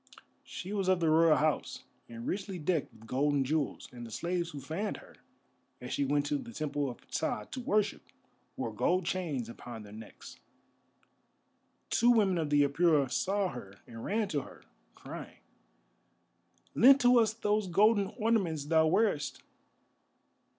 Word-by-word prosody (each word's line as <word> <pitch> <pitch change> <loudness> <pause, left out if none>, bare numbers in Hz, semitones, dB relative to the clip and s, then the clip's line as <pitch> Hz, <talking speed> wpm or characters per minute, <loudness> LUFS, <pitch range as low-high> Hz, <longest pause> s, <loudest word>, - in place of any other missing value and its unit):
She 190 +3 -7
was 195 -3 -1
of 185 -1 +3
the 165 -2 +2
Royal 160 0 +5
House, 155 -1 -1 0.3
and 115 0 -8
richly 195 -1 -3
decked 165 -1 -1
with 110 0 -17
gold 145 +5 0
and 135 -1 +1
jewels, 150 +1 -2
and 120 -1 -9
the 115 - -8
slaves 170 +8 -2
who 145 - -7
fanned 165 +10 -4
her, - - -16 0.6
as 125 0 -6
she 140 - 0
went 145 +1 +1
to 290 - -1
the 245 -3 -9
Temple 145 -4 -2
of 120 - -8
Ptah 105 - -1
to 260 - -5
worship, 210 -3 0 0.6
wore - - -3
gold 185 0 +1
chains 160 -11 -2
upon 115 -1 -9
their 105 0 -12
necks. 110 0 -12 1.5
Two 235 - +4
women 200 -7 +3
of 155 -2 -2
the 145 0 +4
Apura 145 -2 +2
saw 195 0 0
her 100 - -9
and 115 -1 -10
ran 215 +1 0
to 145 - -1
her, - - -14 0.3
crying: - - -9 1.4
"Lend 270 +3 +7
to 245 0 +6
us 220 -1 +2
those 210 -2 0
golden 200 +3 +3
ornaments 200 - 0
thou 160 +1 +3
wearest." 155 - 0
165 Hz, 160 wpm, -31 LUFS, 140-205 Hz, 1.5 s, Lend